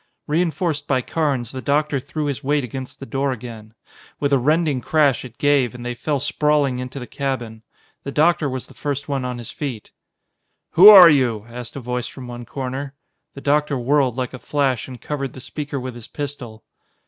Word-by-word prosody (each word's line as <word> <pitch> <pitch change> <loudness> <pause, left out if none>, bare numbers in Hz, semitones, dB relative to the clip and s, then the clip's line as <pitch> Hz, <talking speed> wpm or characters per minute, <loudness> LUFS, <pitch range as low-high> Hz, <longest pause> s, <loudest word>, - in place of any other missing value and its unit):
Reinforced 165 0 -1
by 130 -2 +1
Carnes, 140 -8 -1
the 130 - -6
doctor 145 0 +1
threw 150 +3 -4
his 140 0 -3
weight 145 +1 +1
against 130 +2 -7
the 135 - -7
door 135 +1 -1
again. 115 -3 -8 0.4
With 140 -1 +1
a 135 - +5
rending 150 0 +1
crash 145 -2 +2
it 125 0 -11
gave, 140 -4 +2
and 120 0 -8
they 120 - -2
fell 140 +4 -2
sprawling 145 -2 +1
into 125 +2 -6
the 125 - -5
cabin. 120 -5 -4 0.4
The 140 - -5
doctor 155 0 +3
was 130 -1 -4
the - - -16
first 145 -1 -3
one 140 -3 -2
on 125 -1 -3
his 120 -2 -7
feet. 130 -8 -6 0.8
"Who 195 +5 +10
are 185 -5 +11
you?" 120 -7 +1
asked 120 0 -8
a - - -4
voice 125 0 -3
from 130 - -9
one 120 0 -8
corner. 135 +2 -5 0.4
The 140 - -8
doctor 145 0 +1
whirled 130 0 +1
like 130 0 -3
a 130 - -7
flash 135 -4 0
and 125 -2 -9
covered 140 0 -4
the - - -10
speaker 145 +2 -5
with 130 0 -5
his 120 -2 -11
pistol. 140 -7 -6
135 Hz, 195 wpm, -21 LUFS, 125-145 Hz, 0.8 s, are